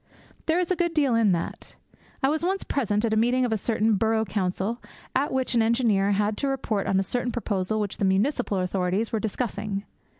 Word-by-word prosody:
There 320 +1 +3
is 360 0 0
a - - +3
good 345 -1 -1
deal 280 -5 +3
in 225 -3 +4
that. 170 - -5 0.5
I 270 - +4
was 315 +2 -1
once 385 +2 0
present 215 -5 0
at 220 - 0
a - - +3
meeting 245 +3 +3
of 235 - 0
a - - +2
certain 220 0 +1
Borough 220 +1 +1
Council, 195 +3 -2 0.3
at 275 +3 +1
which 260 -1 0
an 235 - +4
engineer 225 -4 +2
had 210 +1 0
to 280 - -1
report 240 -7 -1
on 190 - +2
a - - +1
certain 245 +5 -1
proposal 215 -3 -1
which 205 -2 -3
the 200 - 0
municipal 205 +3 +1
authorities 185 +3 0
were 225 - 0
discussing. 210 -2 -3
220 Hz, 210 wpm, -26 LUFS, 200-255 Hz, 0.5 s, in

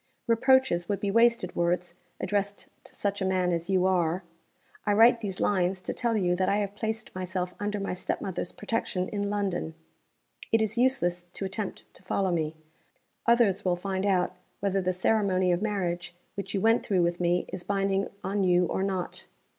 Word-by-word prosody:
Reproaches 235 -6 +3
would 200 - 0
be 200 - -1
wasted 230 -4 +3
words, 175 0 0 0.3
addressed 200 +1 -2 0.2
to - - -12
such 200 0 -2
a - - +1
man 185 -1 +1
as 170 +1 -2
you 185 -1 +3
are. 180 -1 +1 0.6
I 205 - +2
write 230 +2 +6
these 195 -4 -4
lines 185 -1 +1
to - - -3
tell 235 -2 0
you 180 -3 +2
that 185 - +1
I 200 - +2
have 200 -1 -2
placed 220 +1 -4
myself 185 0 -3
under 205 0 -2
my 195 -2 -2
step 180 - -2
mother's 185 -2 -4
protection 205 -4 -2
in 205 -1 -2
London. 195 -6 -2 0.8
It 225 - +4
is 220 0 0
useless 175 -9 +1
to 195 - -3
attempt 195 +1 -5
to - - -12
follow 185 0 0
me. 160 -2 -1 0.7
Others 225 -5 +4
will 180 -1 +2
find 190 +2 -2
out 185 -1 +1 0.2
whether 195 -1 0
the 185 0 +1
ceremony 185 -1 +2
of 175 +1 +1
marriage 180 -5 -2 0.2
which 200 0 -5
you 195 - 0
went 225 +2 +4
through 185 -4 +2
with 170 0 0
me 175 0 +1
is - - -5
binding 195 0 0 0.2
on 200 +1 0
you 180 -1 +4
or 180 - -2
not. 190 -2 -3
195 Hz, 185 wpm, -28 LUFS, 180-205 Hz, 0.8 s, write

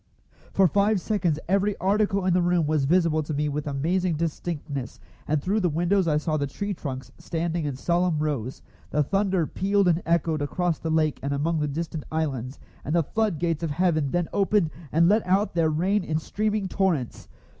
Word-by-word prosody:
For 195 -1 +4
five 200 +3 +2
seconds 180 -6 0
every 195 +2 +1
article 200 0 +1
in 185 - +3
the 180 - +3
room 175 -2 +2
was 150 -2 +1
visible 165 0 +3
to 150 0 -4
me 150 +1 0
with 150 +1 -3
amazing 165 +5 0
distinctness, 150 -4 -4 0.3
and 155 0 +1
through 195 +9 0
the 180 -4 +1
windows 175 +4 +1
I 150 -2 +3
saw 155 0 -1
the 140 -1 -1
tree 200 +8 -4
trunks 130 -7 -6
standing 165 -1 -2
in 145 -3 -2
solemn 175 +3 +1
rows. 140 -5 -3 0.3
The 150 - +2
thunder 190 +1 +1
pealed 200 +4 +1
and 170 0 +3
echoed 165 -2 +1
across 170 +3 -1
the 165 - -3
lake 155 -2 +1
and 140 +1 -2
among 160 +3 0
the 150 - 0
distant 160 +1 -4
islands, 135 -5 -2 0.3
and 155 - -1
the 170 - +3
flood 215 +1 0
gates 165 -1 -1
of 165 - -1
heaven 155 -2 +1
then 175 +2 0
opened 200 -4 +2 0.2
and 165 +2 +4
let 210 +4 +4
out 195 +3 +2
their 165 -2 +2
rain 185 +6 +1
in 155 -2 -1
streaming 210 +4 -1
torrents. 180 -11 -1
165 Hz, 195 wpm, -25 LUFS, 150-185 Hz, 0.3 s, For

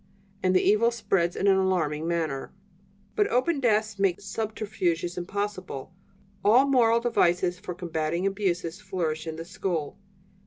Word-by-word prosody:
And 185 0 +2
the 185 - +4
evil 215 +3 +4
spreads 195 -7 0
in - - -1
an 195 -1 +5
alarming 165 -5 0
manner. 160 -5 -2 0.6
"But 415 - +3
open 285 +1 +1
desks 215 -4 +1
make 195 -3 +2
subterfuges 200 -5 -2
impossible. 185 -4 -4 0.5
All 240 +6 +6
moral 235 -4 +4
devices 180 -6 +2
for 185 -3 -6
combating 170 0 -2
abuses 190 -2 -1
flourish 165 -5 -3
in 160 - -4
the 165 +1 -7
school. 175 -5 -3
190 Hz, 140 wpm, -27 LUFS, 170-215 Hz, 0.6 s, All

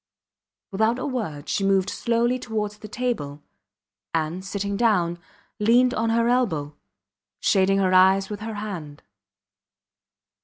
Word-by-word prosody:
Without 220 +4 +1
a 255 - -4
word 205 - -4
she 200 - -1
moved 195 0 +2
slowly 235 +2 0
towards 210 -3 -4
the 215 - -9
table, 205 - -3 0.7
and, 165 +3 -2
sitting 200 +1 -3
down, 180 -6 +1 0.4
leaned 245 +4 +4
on 225 +1 0
her 230 +1 +2
elbow, 165 - 0 0.6
shading 195 0 +3
her 190 -1 +2
eyes 190 +1 +5
with 210 -1 -6
her 220 0 -5
hand. 175 -9 -7
205 Hz, 125 wpm, -24 LUFS, 185-230 Hz, 0.7 s, eyes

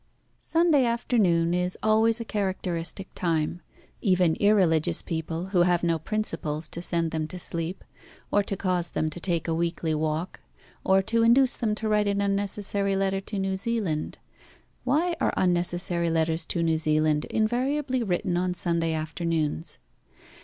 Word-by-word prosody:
Sunday 325 -5 +3
afternoon 205 -8 +2
is 180 +1 -1
always 220 +1 +3
a 230 - -4
characteristic 190 -3 -3
time. 165 0 -1 0.4
Even 180 -5 +3
irreligious 185 -7 +3
people, 165 +2 -4
who 185 -3 +3
have 175 -1 +3
no 165 -1 +1
principles 160 -5 -3
to 170 - -6
send 170 -2 0
them 155 -1 -2
to 180 - -7
sleep, 170 0 -3 0.5
or 205 - +4
to 200 -1 -3
cause 180 -3 0
them 155 0 -1
to 175 - -7
take 170 -2 -1
a 165 - 0
weekly 165 -1 -1
walk, 155 +3 -2 0.4
or 190 0 +3
to 230 +4 +1
induce 245 +3 +4
them 215 -2 -1
to 220 0 -3
write 210 -1 +2
an 200 0 +1
unnecessary 200 0 -1
letter 195 0 0
to 205 +1 -6
New 190 0 -1
Zealand 190 -7 -2 0.7
why 320 +7 +2
are - - +2
unnecessary 175 -1 0
letters 160 0 +1
to 170 - 0
New 160 -1 +1
Zealand 155 -1 +1
invariably 255 +4 0
written 180 -3 0
on 180 0 0
Sunday 170 -2 0
afternoons? 160 0 -2
180 Hz, 155 wpm, -26 LUFS, 165-210 Hz, 0.7 s, or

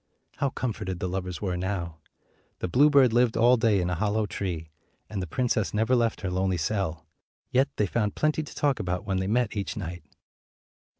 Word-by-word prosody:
How 140 - +1
comforted 105 -8 -3
the 90 - -2
lovers 90 +1 -4
were 90 -3 -1
now! 90 -3 -3 0.6
The - - -3
bluebird 135 - +5
lived 120 -1 +3
all 120 +2 +6
day 115 -4 +3
in 90 - 0
a - - +1
hollow 105 +4 0
tree, 85 -6 -4 0.4
and 100 -3 -2
the 90 - -4
princess 110 +1 0
never 110 +4 +3
left 115 -2 +1
her 95 -3 -2
lonely 95 0 0
cell; 85 -1 -2 0.5
yet 135 +2 +3
they 105 - +2
found 105 +1 -1
plenty 155 +1 +1
to 150 - -9
talk 140 -5 +1
about 90 0 -2
when 95 -2 -1
they 95 - -1
met 115 +1 +1
each 100 +2 -3
night. 85 -4 -5
105 Hz, 190 wpm, -27 LUFS, 90-120 Hz, 0.6 s, all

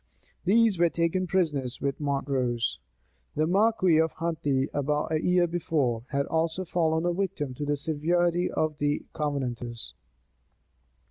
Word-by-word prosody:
These 215 -1 +4
were 170 -1 +5
taken 170 +3 0
prisoners 150 -9 0
with 140 -1 -2
Montrose. 135 -5 -1 0.6
The 155 - +2
marquis 185 -2 +3
of 160 0 +2
Huntley, 145 -5 -1
about 150 +2 -1
a 155 -1 +1
year 180 0 +3
before, 145 -9 -1
had 140 0 -1
also 165 +3 -1
fallen 160 -1 +1
a 175 - +1
victim 170 -7 -2
to 145 +4 -4
the 145 0 +1
severity 170 +4 +1
of 155 -2 -1
the 145 0 0
Covenanters. 120 - -3
155 Hz, 135 wpm, -27 LUFS, 140-175 Hz, 0.6 s, were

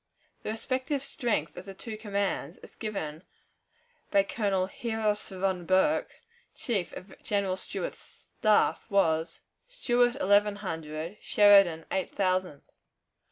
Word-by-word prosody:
The - - -5
respective 260 +5 -2
strength 220 - -1
of 185 - -8
the 195 - -8
two 220 +3 -7
commands, 200 -6 -2
as - - -13
given 160 -8 -5 0.9
by 200 - +4
Colonel 195 -3 0
Heros 215 0 -1
von 185 -2 -2
Borke, 190 +12 +2 0.4
chief 200 -8 -1
of 190 - -11
General 200 -3 0
Stuart's - - -7
staff, 215 -2 +3
was, 165 -4 +1 0.3
Stuart, 245 - +2
eleven 205 -6 +3
hundred; 165 -2 -5
Sheridan, 195 -6 +5
eight 190 - -2
thousand. 185 -6 0
200 Hz, 115 wpm, -29 LUFS, 185-220 Hz, 0.9 s, Sheridan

